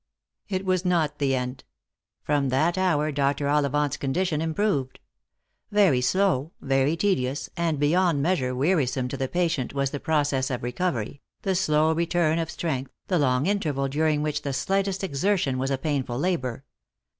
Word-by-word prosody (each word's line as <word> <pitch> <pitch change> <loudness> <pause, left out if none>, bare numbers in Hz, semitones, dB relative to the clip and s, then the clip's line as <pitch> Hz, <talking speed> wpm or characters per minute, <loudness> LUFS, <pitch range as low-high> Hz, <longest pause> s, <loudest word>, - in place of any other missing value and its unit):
It 190 -1 -2
was 185 -1 +1
not 165 -5 +1
the 135 -2 +2
end. 125 +1 -4 0.6
From 145 -2 +1
that 155 +7 +2
hour 165 -5 +1
Dr. 140 0 0
Ollivant's 145 0 +1
condition 155 +3 -1
improved. 160 -5 -1 0.7
Very 195 -11 +4
slow, 170 -1 +1
very 135 +3 +1
tedious, 145 -8 0
and 170 -3 0
beyond 160 +2 +2
measure 140 -5 0
weari 145 0 +2
some 130 -1 -2
to 140 - -4
the 135 -1 -2
patient 165 -6 -1
was 140 -1 0
the 145 - -4
process 145 -3 0
of 125 -3 -3
recovery, 125 -1 -2 0.2
the 195 - +1
slow 160 -3 +2
return 170 -1 +1
of 165 -1 -2
strength, 135 -7 -3 0.2
the 180 -3 +2
long 130 -1 +2
interval 155 -9 0
during 150 +1 +1
which 150 -1 -1
the 140 -2 -3
slightest 195 +5 0
exer 195 +3 +1
tion 135 -7 -1
was 135 +1 -1
a 135 - 0
painful 135 -3 -2
labour. 135 -7 -1
150 Hz, 165 wpm, -25 LUFS, 135-175 Hz, 0.7 s, Very